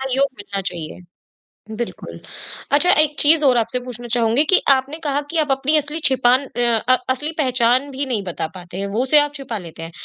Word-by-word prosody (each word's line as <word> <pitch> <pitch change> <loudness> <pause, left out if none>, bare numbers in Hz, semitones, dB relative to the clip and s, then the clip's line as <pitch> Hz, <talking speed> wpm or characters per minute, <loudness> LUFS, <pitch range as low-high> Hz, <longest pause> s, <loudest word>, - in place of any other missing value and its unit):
सहयोग 270 +1 +1
मिलना 200 -1 -4
चाहिए। 170 -3 -6 0.8
बिल्कुल। 240 - -6 0.5
अच्छा 295 +5 +4
एक 300 -1 0
चीज़ 305 +1 +5
और 255 -3 +4
आपसे 235 +2 -1
पूछना 240 -1 -7
चाहूँगी 235 +4 +2
कि 375 - +6
आपने 275 +3 +2
कहा 285 0 0
कि 335 - -3
आप 295 - -2
अपनी 270 +3 +1
असली 300 +2 -2
छिपान 260 +1 +3
अ 245 - -5 0.3
अ, - - +7 0.2
असली 295 +5 -1
पहचान 255 0 +2
भी 275 +1 -3
नहीं 225 -6 -2
बता 170 -3 -4
पाते 180 0 -10
हैं 200 - -3
वो 235 - +1
उसे 295 +3 +4
आप 290 0 0
छिपा 265 -5 -5
लेते 165 -3 -9
हैं। 165 - -8
260 Hz, 205 wpm, -20 LUFS, 230-285 Hz, 0.8 s, अ